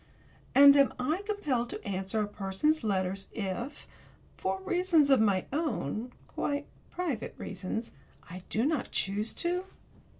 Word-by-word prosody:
And 280 Hz, +1 st, +10 dB
am 280 Hz, -1 st, +5 dB
I 305 Hz, +9 st, 0 dB
compelled 285 Hz, -, 0 dB
to -, -, -7 dB
answer 195 Hz, +2 st, -1 dB
a -, -, -2 dB
person's 205 Hz, +11 st, 0 dB
letters 195 Hz, -2 st, -1 dB
if, 225 Hz, +6 st, -4 dB, 0.5 s
for 190 Hz, 0 st, -2 dB
reasons 345 Hz, -5 st, +3 dB
of 265 Hz, -, +6 dB
my 200 Hz, -4 st, +2 dB
own 250 Hz, -, -2 dB, 0.2 s
quite 285 Hz, 0 st, -2 dB, 0.2 s
private 315 Hz, -11 st, -3 dB
reasons 200 Hz, +4 st, -4 dB, 0.4 s
I 180 Hz, +2 st, -8 dB
do 225 Hz, +3 st, +1 dB
not 305 Hz, -1 st, 0 dB
choose 205 Hz, +3 st, -1 dB
to? 355 Hz, +2 st, -1 dB
240 Hz, 135 wpm, -30 LUFS, 195-300 Hz, 0.5 s, And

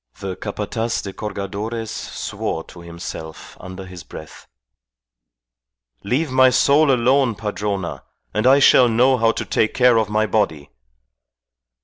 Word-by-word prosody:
The 95 Hz, -1 st, -5 dB
Capataz 110 Hz, +3 st, -3 dB
de 100 Hz, -, -6 dB
Cargadores 105 Hz, +3 st, -5 dB
swore 80 Hz, -, -5 dB
to 85 Hz, -, -14 dB
himself 85 Hz, -2 st, -9 dB
under 95 Hz, +1 st, -9 dB
his 90 Hz, -1 st, -10 dB
breath. 80 Hz, -, -12 dB, 1.6 s
"Leave 135 Hz, +7 st, -1 dB
my 130 Hz, 0 st, +5 dB
soul 140 Hz, +3 st, +4 dB
alone, 130 Hz, -1 st, +2 dB
Padrona, 100 Hz, -3 st, -4 dB, 0.3 s
and 110 Hz, +4 st, +1 dB
I 135 Hz, +2 st, +7 dB
shall 130 Hz, -3 st, +6 dB
know 125 Hz, +3 st, +3 dB
how 115 Hz, -1 st, +3 dB
to -, -, -4 dB
take 110 Hz, -, 0 dB
care 125 Hz, -2 st, +4 dB
of 110 Hz, -2 st, -1 dB
my 110 Hz, +1 st, +1 dB
body. 80 Hz, -, -1 dB
110 Hz, 130 wpm, -20 LUFS, 95-125 Hz, 1.6 s, I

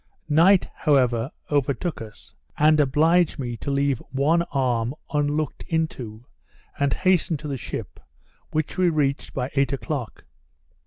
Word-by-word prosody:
Night, 175 Hz, +6 st, +5 dB
however, 125 Hz, -5 st, +2 dB, 0.2 s
overtook 145 Hz, +3 st, 0 dB
us, 110 Hz, -2 st, -12 dB, 0.2 s
and 155 Hz, +1 st, +5 dB
obliged 160 Hz, +5 st, +3 dB
me 120 Hz, -3 st, -4 dB
to 140 Hz, -, -5 dB
leave 140 Hz, -2 st, +1 dB
one 150 Hz, +5 st, +2 dB
arm 125 Hz, -2 st, 0 dB, 0.2 s
unlooked 150 Hz, +1 st, -1 dB
into, 125 Hz, -9 st, -3 dB, 0.5 s
and 140 Hz, -1 st, +2 dB
hasten 180 Hz, -2 st, +2 dB
to 150 Hz, +1 st, -8 dB
the 140 Hz, -, -2 dB
ship, 130 Hz, -, -6 dB, 0.5 s
which 155 Hz, +3 st, -2 dB
we 180 Hz, -1 st, +4 dB
reached 145 Hz, -4 st, -1 dB
by 130 Hz, 0 st, -2 dB
eight 140 Hz, 0 st, +1 dB
o'clock. 130 Hz, -1 st, -4 dB
140 Hz, 135 wpm, -24 LUFS, 130-155 Hz, 0.5 s, Night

